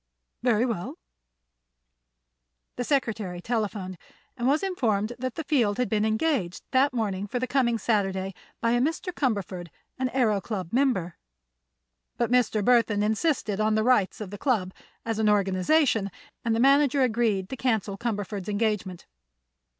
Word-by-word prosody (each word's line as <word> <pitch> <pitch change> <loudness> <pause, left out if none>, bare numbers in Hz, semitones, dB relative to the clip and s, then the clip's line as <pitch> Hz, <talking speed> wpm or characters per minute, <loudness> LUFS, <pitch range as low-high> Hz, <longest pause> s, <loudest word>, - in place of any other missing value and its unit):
"Very 235 -1 +3
well." 220 -8 -4 1.8
The 245 - -2
secretary 225 -10 -1
telephoned, 200 -4 -3 0.4
and 245 -1 -1
was 295 +5 +2
informed 230 - 0
that 255 -1 -3
the 320 - -4
Field 250 -9 +1
had 250 -1 0
been 215 -1 +1
engaged 220 - 0
that 270 +2 +4
morning 205 -5 -2
for 245 - -3
the 250 - 0
coming 250 -3 +1
Saturday 195 -3 0 0.3
by 230 - +2
a 240 0 +2
Mr. 330 +6 -1
Cumberford, 200 - -2 0.3
an 260 -1 0
Aëro 225 -6 +1
Club 190 -5 -5
member. 240 -10 +1 1.0
But 235 -1 0
Mr. 235 -4 +2
Burthon 230 -4 +3
insisted 215 -1 0
on 215 0 +2
the 215 - +2
rights 225 -6 +2
of 205 -3 -6
the 205 - -7
Club, 205 -9 0 0.3
as 225 -1 -2
an 215 -1 +3
organization, 205 - +2 0.3
and 230 -1 +1
the - - 0
manager 275 +1 +4
agreed 220 -5 +1
to - - -4
cancel 220 -6 0
Cumberford's 205 -3 -3
engagement. 205 -4 -1
220 Hz, 150 wpm, -26 LUFS, 200-255 Hz, 1.8 s, that